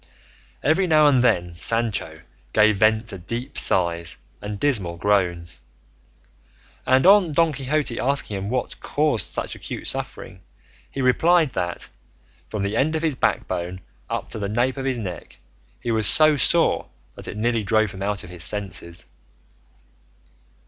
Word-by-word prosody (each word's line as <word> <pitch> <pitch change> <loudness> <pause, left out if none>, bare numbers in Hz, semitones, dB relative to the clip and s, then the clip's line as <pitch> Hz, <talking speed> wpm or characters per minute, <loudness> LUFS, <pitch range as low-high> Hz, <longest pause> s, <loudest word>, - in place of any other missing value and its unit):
Every 180 +5 +2
now 155 -2 +4
and 130 -4 +4
then 90 -7 +1
Sancho 115 +5 -2 0.3
gave 105 -1 +3
vent 110 +2 +2
to 95 - -6
deep 115 +8 -6
sighs 85 -3 0 0.2
and 105 -1 -6
dismal 100 -11 -1
groans, 85 -7 -1 1.3
and 130 +3 +3
on 190 -4 +5
Don 165 0 +2
Quixote 140 -2 -2
asking 135 -5 -1
him 100 +1 -5
what 125 +1 -3
caused 145 -7 0
such - - -4
acute - - -8
suffering, 95 -1 -5 0.5
he 135 - -4
replied 160 +4 +3
that, 85 -5 -4 0.6
from 105 -2 -4
the 100 +2 -2
end 150 +6 0
of 160 - -3
his 160 -3 +1
back - - -1
bone 90 +1 -5 0.3
up - - -4
to - - -6
the 100 -1 -3
nape 120 +5 -1
of 135 - -5
his 130 -2 -1
neck, 95 -6 -8 0.4
he 120 -1 -4
was 110 -2 +4
so 155 -1 +9
sore 140 - +3 0.3
that - - -8
it - - -7
nearly 115 0 -1
drove 110 0 +1
him 95 - -10
out 100 0 -2
of 90 - -12
his 85 -2 -9
senses. 95 -4 -5
110 Hz, 155 wpm, -22 LUFS, 95-135 Hz, 1.3 s, so